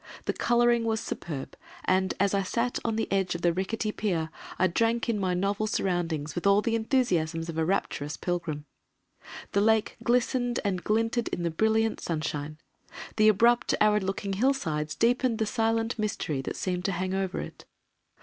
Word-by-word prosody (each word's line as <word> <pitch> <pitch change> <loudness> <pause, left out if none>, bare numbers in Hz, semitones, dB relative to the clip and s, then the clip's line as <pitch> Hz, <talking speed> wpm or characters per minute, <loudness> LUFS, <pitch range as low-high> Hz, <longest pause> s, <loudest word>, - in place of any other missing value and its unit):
The - - 0
colouring 240 0 +3
was 220 -1 0
superb 150 -10 -5 0.3
and, 185 0 +2
as 200 0 +2
I 200 - +2
sat 235 +6 -1
on 225 -2 0
the 225 - -1
edge 190 -2 +1
of 170 - -6
the 175 -1 +3
rickety 210 +4 -2
pier, 170 -7 -1 0.3
I 185 - +3
drank 225 +6 +1
in 225 -3 0
my 185 -2 0
novel 200 +3 0
surroundings 175 -7 -1
with 175 +2 -1
all 200 +1 +5
the 230 - 0
enthusiasms 180 - 0
of 165 - -5
a - - +2
rapturous 160 -4 -1
pilgrim. 170 -5 -3 0.9
The 200 - +2
Lake 220 0 +2
glistened 245 0 +1
and 185 -3 -1
glinted 225 +2 +1
in 175 - -3
the 170 - 0
brilliant 220 +5 +1
sunshine, 155 -2 -3 0.6
the 215 0 +5
abrupt 235 +4 +4
arid 210 0 +4
looking 195 +1 -2
hill 260 +8 +3
sides 155 - -3
deepened 245 0 +2
the 220 - 0
silent 225 +1 0
mystery 180 -9 -1
that - - -5
seemed 180 -1 -2
to 195 - +1
hang 185 +2 -2
over 190 -1 -1
it. - - -8
200 Hz, 180 wpm, -28 LUFS, 175-225 Hz, 0.9 s, all